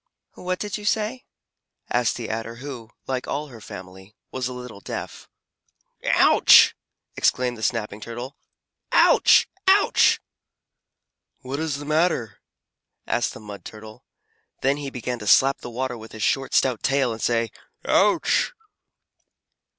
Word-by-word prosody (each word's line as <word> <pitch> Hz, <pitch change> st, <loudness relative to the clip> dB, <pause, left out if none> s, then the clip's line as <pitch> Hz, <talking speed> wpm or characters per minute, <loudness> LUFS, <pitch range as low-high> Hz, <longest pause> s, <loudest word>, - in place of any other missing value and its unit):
"What 185 Hz, 0 st, -3 dB
did 210 Hz, +1 st, -4 dB
you 210 Hz, -, -9 dB
say?" 220 Hz, +4 st, -1 dB, 0.7 s
asked 120 Hz, -1 st, +1 dB
the 120 Hz, -, -5 dB
Adder 115 Hz, +1 st, -4 dB
who, 125 Hz, -3 st, -8 dB, 0.2 s
like 130 Hz, -1 st, -3 dB
all 150 Hz, +1 st, -3 dB
her 115 Hz, -4 st, -12 dB
family, 95 Hz, +2 st, -11 dB, 0.2 s
was 130 Hz, -1 st, -3 dB
a -, -, -6 dB
little 125 Hz, -4 st, -9 dB
deaf. -, -, -7 dB, 0.7 s
"Ouch!" -, -, +6 dB, 0.4 s
exclaimed 125 Hz, -1 st, +1 dB
the 110 Hz, -, -11 dB
Snapping 110 Hz, -2 st, -2 dB
Turtle. 120 Hz, +5 st, -7 dB, 0.6 s
"Ouch! -, -, +5 dB, 0.2 s
Ouch!" 395 Hz, +2 st, +4 dB, 1.2 s
"What 135 Hz, +2 st, -5 dB
is 160 Hz, -3 st, -2 dB
the 145 Hz, -, -8 dB
matter?" 155 Hz, -, 0 dB, 0.7 s
asked -, -, -1 dB
the -, -, -9 dB
Mud 105 Hz, -2 st, -10 dB
Turtle. 110 Hz, 0 st, -11 dB, 0.6 s
Then 135 Hz, +1 st, +2 dB
he 145 Hz, -1 st, -5 dB
began 125 Hz, -1 st, -5 dB
to 105 Hz, -, -8 dB
slap 135 Hz, +6 st, +5 dB
the -, -, -8 dB
water 125 Hz, +1 st, -3 dB
with 110 Hz, 0 st, -12 dB
his 110 Hz, -, -5 dB
short, 135 Hz, -1 st, 0 dB
stout 125 Hz, -4 st, +2 dB
tail, 135 Hz, -3 st, +1 dB
and 110 Hz, -, -8 dB
say 115 Hz, -1 st, 0 dB, 0.3 s
"Ouch!" -, -, +2 dB
125 Hz, 140 wpm, -23 LUFS, 110-140 Hz, 1.2 s, Ouch